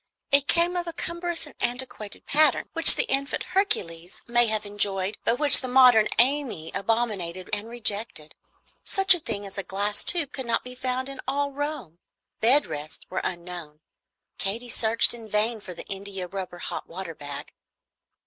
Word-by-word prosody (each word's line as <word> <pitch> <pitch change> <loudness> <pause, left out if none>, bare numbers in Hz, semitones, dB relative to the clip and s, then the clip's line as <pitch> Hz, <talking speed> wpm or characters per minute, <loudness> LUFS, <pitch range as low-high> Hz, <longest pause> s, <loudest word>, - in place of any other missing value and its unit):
It 280 0 +3
came 345 +1 +2
of 350 -1 -3
a 335 - -4
cumbrous 340 0 -3
and 295 - -12
antiquated 240 -4 -4
pattern, 300 -2 +2
which 330 0 +9
the - - +1
infant 275 - +1
Hercules 175 - -1
may 240 0 +3
have 215 -1 -2
enjoyed, 205 -1 -2
but 235 - +1
which 290 -1 +7
the 255 - -4
modern 250 -4 +5
Amy 245 - +1
abominated 195 -4 -3
and 210 +1 -3
rejected. 210 -8 -1 0.5
Such 385 -1 +5
a 355 - -1
thing 205 -9 -6
as 195 +1 -7
a - - -3
glass 200 +2 -2
tube 335 -6 +2
could 265 -3 -6
not 230 - -1
be 250 - -9
found 255 0 -4
in 275 -1 -8
all 280 +1 -1
Rome. 280 - -6 0.4
Bed 255 +6 +4
rests 150 +1 -8
were 185 - -2
unknown. 175 -4 -7 0.6
Katy 230 +5 -2
searched 230 -1 +3
in 230 -2 -11
vain 215 +2 0
for 185 - -9
an - - -8
India 195 -1 -4
rubber 185 -1 -7
hot - - -6
water 175 -1 -7
bag. 145 -2 -8
225 Hz, 170 wpm, -25 LUFS, 195-275 Hz, 0.6 s, which